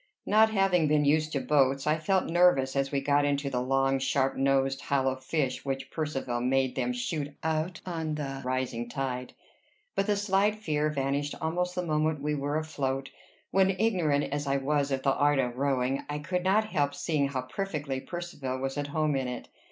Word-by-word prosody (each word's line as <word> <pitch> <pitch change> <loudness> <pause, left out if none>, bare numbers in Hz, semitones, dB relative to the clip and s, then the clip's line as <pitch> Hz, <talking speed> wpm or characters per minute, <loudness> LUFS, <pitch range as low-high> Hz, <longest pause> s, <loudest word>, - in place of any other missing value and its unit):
Not 220 +1 +5
having 195 -6 +3
been 150 0 +3
used 155 +2 +2
to 140 - +1
boats, 135 -1 +2
I 155 +1 +2
felt 185 +4 +1
nervous 165 -7 +3
as 135 0 0
we 140 -1 0
got 145 +1 +3
into 140 -1 0
the 125 -1 0
long, 135 +1 +2
sharp 135 0 +1
nosed, 135 0 +1
hollow 135 -2 +1
fish 130 0 -2
which 135 -1 -4
Percivale 135 -6 -2
made 130 +1 +1
them 125 -2 0
shoot 140 +3 -3
out 160 +2 -1
on 160 -4 -3
the 135 -2 -4
rising 125 -2 -2
tide; 125 0 -3 0.6
but 195 +1 0
the 210 - +3
slight 205 +1 +2
fear 155 -8 0
vanished 140 0 -1
almost 180 +3 -1
the 180 -1 -1
moment 155 -1 +1
we 150 +1 -1
were 145 +1 -1
afloat, 135 -4 -2 0.4
when, 190 0 +3
ignorant 170 -10 +2
as 145 0 -3
I 135 0 +2
was 140 +1 0
of 135 -1 -1
the 135 - +3
art 145 0 +3
of 125 -2 -1
rowing, 135 -1 0
I 145 - -2
could 180 +4 -2
not 215 +3 +2
help 145 -4 0
seeing 145 -1 0
how 130 -2 -3
perfectly 145 -3 -3
Percivale 150 -7 -5
was 135 +2 -3
at 145 - -2
home 150 0 0
in 130 -1 -1
it. 125 - -6
145 Hz, 190 wpm, -29 LUFS, 135-160 Hz, 0.6 s, Not